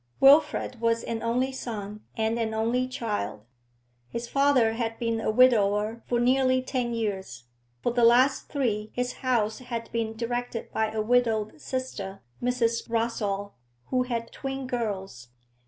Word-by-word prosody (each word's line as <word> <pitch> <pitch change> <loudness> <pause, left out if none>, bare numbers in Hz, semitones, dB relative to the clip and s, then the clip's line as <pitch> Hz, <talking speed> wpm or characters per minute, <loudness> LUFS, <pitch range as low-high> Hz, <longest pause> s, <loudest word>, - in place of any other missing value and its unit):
Wilfrid 280 -3 +5
was 230 0 +2
an 230 -1 -3
only 250 +3 0
son 215 -5 -6 0.2
and 225 +1 0
an 220 -1 -1
only 235 +3 +1
child. 215 - -3 0.6
His 235 - -4
father 275 -4 +3
had 225 -1 -2
been 230 -1 -1
a - - 0
widower 215 -2 +3
for 240 - +1
nearly 255 +1 +3
ten 250 -2 -1
years; 190 - -3 0.4
for - - +2
the 240 -1 +2
last 245 +4 +5
three 220 -7 -1
his 250 0 -1
house 235 -4 +1
had 235 -2 -5
been 225 -1 -2
directed 240 0 -3
by 220 0 0
a 215 -1 -1
widowed 225 +1 +1
sister, 215 -7 -4 0.2
Mrs. 240 -2 0
Rossall, 210 -3 -1 0.4
who 255 - +3
had 235 -2 -3
twin 270 -1 -4
girls. 195 - -4
230 Hz, 145 wpm, -27 LUFS, 220-250 Hz, 0.6 s, Wilfrid